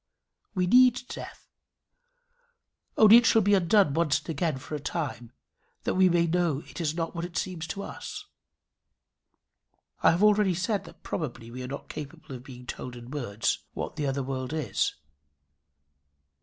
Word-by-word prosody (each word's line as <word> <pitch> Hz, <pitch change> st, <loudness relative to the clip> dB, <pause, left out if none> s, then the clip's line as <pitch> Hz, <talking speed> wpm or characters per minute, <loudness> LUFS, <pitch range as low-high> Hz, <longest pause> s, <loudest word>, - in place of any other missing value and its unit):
We 180 Hz, -1 st, +2 dB
need 250 Hz, +5 st, +6 dB
death; -, -, -9 dB, 1.5 s
only 220 Hz, +1 st, +9 dB
it 240 Hz, -, +4 dB
shall 225 Hz, -, +5 dB
be 205 Hz, +1 st, +3 dB
undone 190 Hz, -3 st, +4 dB
once 160 Hz, -2 st, +2 dB
and -, -, -10 dB
again 155 Hz, -2 st, -1 dB
for 130 Hz, -, -9 dB
a 150 Hz, -, -2 dB
time, 135 Hz, -6 st, -4 dB, 0.5 s
that -, -, 0 dB
we 185 Hz, 0 st, +5 dB
may 170 Hz, -1 st, +3 dB
know 165 Hz, -4 st, 0 dB
it -, -, -7 dB
is 155 Hz, -1 st, -1 dB
not 165 Hz, -1 st, -2 dB
what 170 Hz, -1 st, -4 dB
it 175 Hz, 0 st, -5 dB
seems 170 Hz, -3 st, -3 dB
to 200 Hz, -, -5 dB
us. -, -, -7 dB, 1.8 s
I -, -, +6 dB
have 170 Hz, +5 st, +2 dB
already 210 Hz, -3 st, +4 dB
said 200 Hz, +3 st, -1 dB
that -, -, -15 dB
probably 120 Hz, -7 st, -5 dB
we 125 Hz, +2 st, -7 dB
are 125 Hz, -, -5 dB
not 140 Hz, +2 st, -7 dB
capable 150 Hz, 0 st, -8 dB
of 125 Hz, -1 st, -8 dB
being 125 Hz, -2 st, -11 dB
told 125 Hz, 0 st, -6 dB
in 120 Hz, +1 st, -10 dB
words 120 Hz, -8 st, -1 dB
what -, -, -5 dB
the 150 Hz, -3 st, -1 dB
other 135 Hz, 0 st, -1 dB
world 130 Hz, +1 st, -4 dB
is. 155 Hz, -2 st, -1 dB
160 Hz, 170 wpm, -28 LUFS, 135-185 Hz, 1.8 s, only